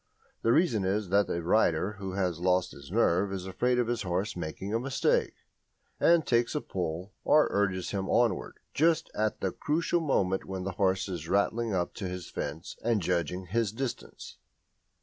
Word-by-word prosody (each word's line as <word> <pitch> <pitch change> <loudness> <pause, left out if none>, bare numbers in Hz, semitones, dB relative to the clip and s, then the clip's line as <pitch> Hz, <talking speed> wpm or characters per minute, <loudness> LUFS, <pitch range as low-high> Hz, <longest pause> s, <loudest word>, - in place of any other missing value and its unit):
The 115 - +3
reason 125 - +3
is 95 +1 0
that 100 +1 +3
a 85 - -2
rider 95 +1 +2
who 95 -1 -5
has 90 -4 -1
lost 90 0 +2
his 70 -1 -12
nerve 95 +4 +2
is 95 -1 -4
afraid 125 +7 0
of 125 - +2
his 120 0 -1
horse 95 +1 -2
making 90 +4 -5
a 115 - +2
mistake, 135 +1 +1 0.6
and 170 -2 +4
takes 120 +3 +1
a 150 - 0
pull, 90 +1 -4
or 155 - +5
urges 95 -3 0
him 95 -1 -2
onward, - - +1 0.2
just 165 +1 +2
at 110 0 -1
the 95 - 0
crucial 165 - 0
moment 95 - +1
when 95 -1 -5
the 95 - -2
horse 95 +1 +1
is 85 -4 -5
rattling 105 +2 +1
up 90 -1 -1
to 100 - -5
his 90 -1 -7
fence 75 +6 -5
and 115 -2 +2
judging 90 +1 -1
his 110 +3 0
distance. 125 +2 -6
95 Hz, 180 wpm, -29 LUFS, 90-115 Hz, 0.6 s, or